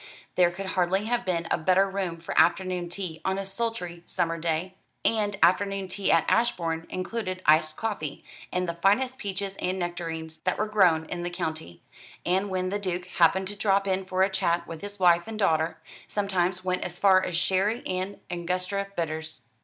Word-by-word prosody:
There 180 -1 +4
could 185 +3 -6
hardly 190 +2 +1
have 240 +2 0
been 170 -2 -1
a - - +2
better 185 +4 +4
room 190 -4 -3
for 165 - -6
afternoon 180 -1 +2
tea 175 -3 -5
on 190 0 0
a 195 - -3
sultry 195 -4 -3
summer 170 -2 0
day; 165 +3 -1 0.3
and 210 -3 +1
afternoon 195 +2 +3
tea 195 +1 0
at 165 -2 +4
Ashbourne 170 -9 +1
included 185 -1 -4
iced 155 0 +4
coffee, 175 -10 -3 0.3
and 180 0 0
the 170 - -1
finest 230 +10 +2
peaches 195 -2 -3
and 185 +1 -1
nectarines 165 -3 -4
that - - 0
were 215 - +1
grown 185 -7 +3
in 175 +2 -4
the 175 - -2
county; 160 - -5 0.4
and 190 +3 +1
when 185 -1 -1
the 205 - -1
Duke 180 -2 -2
happened 190 +3 +4
to 205 - -5
drop 200 -1 +2
in 190 0 +1
for 185 0 +1
a 195 - +3
chat 170 -2 +1
with 165 -2 -8
his 205 0 -7
wife 175 0 +4
and 225 -1 -5
daughter, 160 -5 +1 0.3
sometimes 185 -2 0
went 185 0 0
as 175 0 -5
far 190 -2 +5
as 170 - -1
sherry 195 +6 +1
and 185 +2 -3
Angustura 180 +3 -2
bitters. 160 -4 -4
185 Hz, 185 wpm, -27 LUFS, 170-195 Hz, 0.4 s, far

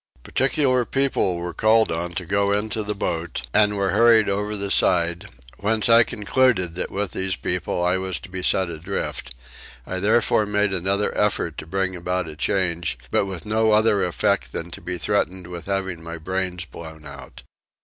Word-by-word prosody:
Particular 130 -1 +2
people 130 -8 0
were 85 0 -5
called 110 +1 +3
on 85 +1 -3
to 90 0 -4
go 100 +2 +1
into 110 +2 -1
the 105 0 -3
boat 85 -7 -3
and 105 -1 +3
were 100 -1 +1
hurried 115 -3 +5
over 105 +2 -1
the 100 0 -3
side; 85 +3 +2 0.3
whence 110 +3 +1
I 115 0 +8
concluded 105 -4 +1
that 90 - -3
with 100 -1 -3
these 95 -1 -2
people 90 - -1
I 90 +1 +2
was 95 -3 -2
to 105 - -11
be 95 0 -5
set 95 -1 +1
adrift: 80 -7 -4 0.5
I 95 - -4
therefore 105 +1 +2
made 105 -1 +1
another 95 +3 0
effort 100 -6 0
to - - -9
bring 95 +1 -1
about 90 0 -2
a 75 - -8
change 85 -3 0
but 100 - +2
with 95 -4 -6
no 110 0 +2
other 105 -2 +3
effect 90 - 0
than 85 +1 -5
to - - -8
be 90 0 -4
threatened 90 +3 -1
with 85 -1 -8
having 95 -3 -2
my 85 0 -7
brains 90 +1 -3
blown 80 -3 -11
out. 70 -3 -11
95 Hz, 180 wpm, -23 LUFS, 85-105 Hz, 0.5 s, I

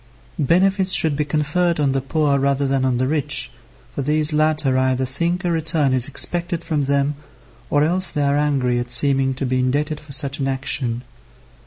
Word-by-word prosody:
Benefits 185 +5 +2
should 155 -3 +5
be 150 +1 -1
conferred 155 +3 -1
on 140 -2 +1
the 135 0 -1
poor 140 0 0
rather 140 +1 0
than 135 -1 0
on 130 -2 0
the 130 +1 0
rich, 150 -3 0 0.4
for - - -4
these 150 +2 +1
latter 155 -3 +1
either 130 0 0
think 170 +8 -3
a 175 - 0
return 160 -4 +1
is 125 -2 +1
expected 170 +4 0
from 150 -5 -2
them, 140 +1 0 0.6
or 145 0 +2
else 180 +3 +2
they 145 - -2
are 140 0 +1
angry 135 -5 0
at 120 0 -5
seeming 135 +1 +2
to 135 - -3
be 130 0 -1
indebted 145 +4 -1
for 150 -1 -14
such 140 +1 -1
an 135 - -1
action. 130 -3 -2
145 Hz, 190 wpm, -20 LUFS, 135-155 Hz, 0.6 s, should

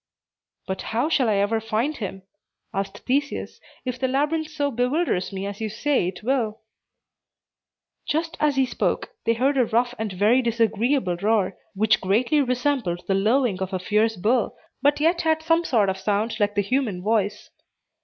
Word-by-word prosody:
"But 190 0 -4 0.2
how 280 +6 +2
shall 260 -7 +2
I 210 - +2
ever 205 +3 +1
find 225 +7 -1
him," 195 -3 -6 0.5
asked 195 0 -4
Theseus, 280 +2 -1 0.2
"if 250 0 -3
the 260 - +1
labyrinth 300 +4 0
so 295 -2 -2
bewilders 250 - 0
me 195 0 -4
as 200 +1 -6
you 220 - -1
say 245 -1 0
it 185 +3 -6
will?" 230 -4 0 1.5
Just 325 +2 -1
as 300 -2 +2
he 265 -1 +3
spoke, 250 - -1
they 230 - +3
heard 270 +4 +2
a 250 - +4
rough 240 +2 +1
and 220 -2 -2
very 210 +7 +3
disagreeable 230 -3 +1
roar, 200 -1 +1 0.2
which 215 +2 +3
greatly 235 +10 +2
resembled 250 -8 0
the 195 - 0
lowing 215 +1 +2
of 190 0 -3
a - - +1
fierce 215 +4 +1
bull, 220 +5 0 0.2
but 285 +2 +3
yet 335 +3 +2
had 315 -1 +1
some 330 +1 +3
sort 220 -10 +2
of 190 0 -1
sound 215 +3 -1
like 205 0 +1
the 205 - +3
human 215 -5 -1
voice. 210 -1 0
230 Hz, 175 wpm, -24 LUFS, 205-275 Hz, 1.5 s, a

